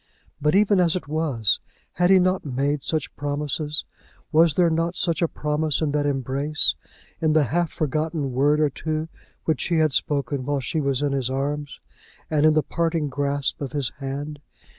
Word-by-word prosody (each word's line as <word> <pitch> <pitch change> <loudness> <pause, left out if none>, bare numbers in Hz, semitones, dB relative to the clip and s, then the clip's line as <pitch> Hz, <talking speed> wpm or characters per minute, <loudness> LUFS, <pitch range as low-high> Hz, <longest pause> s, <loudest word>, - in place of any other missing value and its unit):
But 150 +3 +2
even 205 -1 +4
as 175 -1 +3
it 180 - -4
was, 145 -9 +1 0.3
had 180 0 +2
he 190 - +7
not 185 0 +2
made 140 +1 -1
such 155 0 -3
promises? 145 +1 -2 0.5
Was 160 -1 +4
there 175 -2 +4
not 165 +2 0
such 170 -2 0
a 170 - +3
promise 150 -1 -1
in 155 -3 0
that 145 0 +1
embrace, 140 +2 +1 0.5
in 155 -1 +3
the 155 -1 +4
half 170 +4 0
forgotten 155 -1 -1
word 145 +4 +3
or 150 -2 +2
two 155 +3 -3 0.4
which 160 - 0
he 170 - 0
had 155 -3 +3
spoken 140 -2 0
while 145 +1 -1
she 155 +4 -2
was 140 0 0
in 145 - +1
his 135 -2 -1
arms, 145 +2 -3 0.5
and 155 0 +4
in 155 - +5
the 155 - +3
parting 165 -1 -1
grasp 140 +1 -1
of 135 -3 -4
his 140 -5 0
hand? 145 +2 -5
150 Hz, 185 wpm, -24 LUFS, 140-160 Hz, 0.5 s, he